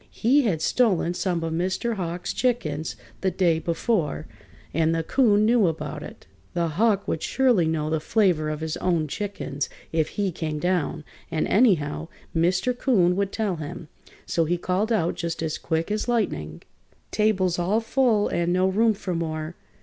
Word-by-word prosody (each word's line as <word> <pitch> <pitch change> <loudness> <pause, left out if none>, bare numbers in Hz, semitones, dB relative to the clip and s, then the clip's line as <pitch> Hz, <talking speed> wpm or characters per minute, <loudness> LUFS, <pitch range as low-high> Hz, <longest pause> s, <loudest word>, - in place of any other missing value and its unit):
He 260 +6 +3
had 165 -7 0
stolen 190 -8 +2
some 175 -2 -1
of 165 0 -2
Mr. 185 +7 -1
Hawk's 175 -3 -3
chickens 160 - -1 0.3
the 190 - +2
day 175 -3 +2
before, 165 - -1 0.5
and 165 +1 +2
the 165 - -1
'Coon 210 - +3
knew 225 -3 +4
about 150 -2 -4
it. - - -10 0.3
The 170 -1 +1
Hawk 200 +5 +1
would 160 - -1
surely 245 -11 +2
know 155 -1 -1
the 160 - +1
flavor 175 -4 +2
of 155 0 -4
his 160 0 -3
own 170 -4 0
chickens 145 -6 -4 0.2
if 160 -2 +1
he 200 -2 +1
came 155 -2 -3
down, 175 -2 -1 0.3
and, 160 -2 -1
anyhow, 165 - +2 0.3
Mr. 180 +9 +2
'Coon 190 -9 +3
would 200 0 0
tell 205 -6 -1
him. 155 +1 -7 0.4
So 165 - +1
he 175 +3 0
called 185 +6 -1
out 175 -7 +2
just 165 -1 -4
as 160 -1 -2
quick 165 +3 -1
as 215 +2 -1
lightning: 85 - -1 0.5
"Table's 190 -5 +1
all 190 +6 +2
full 230 -2 +2
and 170 0 0
no 185 +1 +3
room 220 +3 +3
for 185 -2 -4
more! 160 -1 -3
175 Hz, 170 wpm, -25 LUFS, 160-210 Hz, 0.5 s, knew